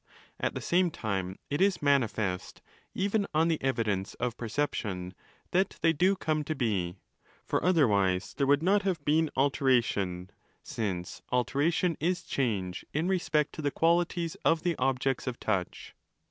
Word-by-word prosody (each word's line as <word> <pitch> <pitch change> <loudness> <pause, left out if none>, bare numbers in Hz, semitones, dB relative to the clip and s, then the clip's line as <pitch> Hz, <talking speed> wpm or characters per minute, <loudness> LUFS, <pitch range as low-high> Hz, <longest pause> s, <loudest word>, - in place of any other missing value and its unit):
At - - -1
the - - -3
same 180 +1 +2
time, 95 - -3
it 145 +5 0
is 195 -1 +3
manifest, 115 -10 0 0.3
even 200 +1 0
on 160 +2 +3
the 160 - 0
evidence 110 -7 -1
of 125 -1 -2
perception, 105 -8 -3 0.4
that 190 +2 +1
they 165 -1 +5
do 185 +6 +3
come 155 -4 -1
to 155 - -2
be: 100 -9 -1 0.5
for - - -1
otherwise 100 - +2
there 140 -1 0
would 145 +2 +3
not 200 +3 +4
have 185 -7 -2
been 155 +1 +3
'altera 135 -1 +3
10 - - 0
tion', 90 -4 -3 0.3
since 95 -5 -4
' - - -34
alteration' 145 +7 +1
is 175 +3 0
change 100 -9 -2
in 160 +3 +1
respect 160 -5 +1
to - - -6
the 145 - +1
qualities 170 +1 +1
of 165 -1 +3
the 175 -2 +1
objects 135 0 0
of 125 -1 -3
touch. 95 -4 -2
140 Hz, 160 wpm, -29 LUFS, 105-165 Hz, 0.5 s, they